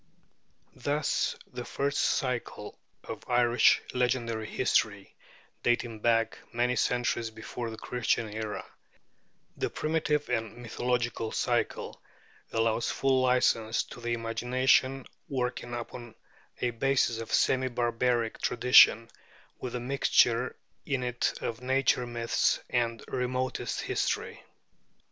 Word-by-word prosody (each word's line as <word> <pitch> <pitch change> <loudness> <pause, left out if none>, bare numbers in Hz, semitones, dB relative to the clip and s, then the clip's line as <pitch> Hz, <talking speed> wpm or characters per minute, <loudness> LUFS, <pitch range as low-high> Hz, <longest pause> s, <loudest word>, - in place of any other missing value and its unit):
Thus 145 0 0 0.2
the 125 0 -5
first 140 +3 -2
cycle 125 -6 -1 0.2
of - - -7
Irish 120 0 +4
legendary 120 -3 0
history, - - 0 0.5
dating 120 -2 0
back 115 0 +1
many 120 +1 +1
centuries 120 -2 0
before 115 +1 -6
the 110 - -8
Christian 120 -1 -1
era, 110 -1 -4 0.9
the - - -2
primitive 155 -1 0
and 115 -2 -2
mythological 120 -1 -2
cycle, - - -1 0.5
allows 115 0 +1
full 135 -1 +2
license 120 -3 +2
to 120 - -12
the 120 0 -1
imagination, 130 +3 +1 0.2
working 125 -2 -2
upon 120 -1 -7 0.5
a 120 - +1
basis 120 -1 +1
of 115 - -7
semi 130 0 +3
barbaric 120 -1 0
tradition, 120 -2 +6 0.5
with 125 -1 -5
a - - -1
mixture 125 -1 +2 0.3
in 135 -3 -1
it 125 0 0
of 115 +1 -4
nature 130 -1 +1
myths 120 -1 +1
and 115 -2 0
remotest 130 0 -2
history. - - -2
120 Hz, 110 wpm, -29 LUFS, 115-125 Hz, 0.9 s, tradition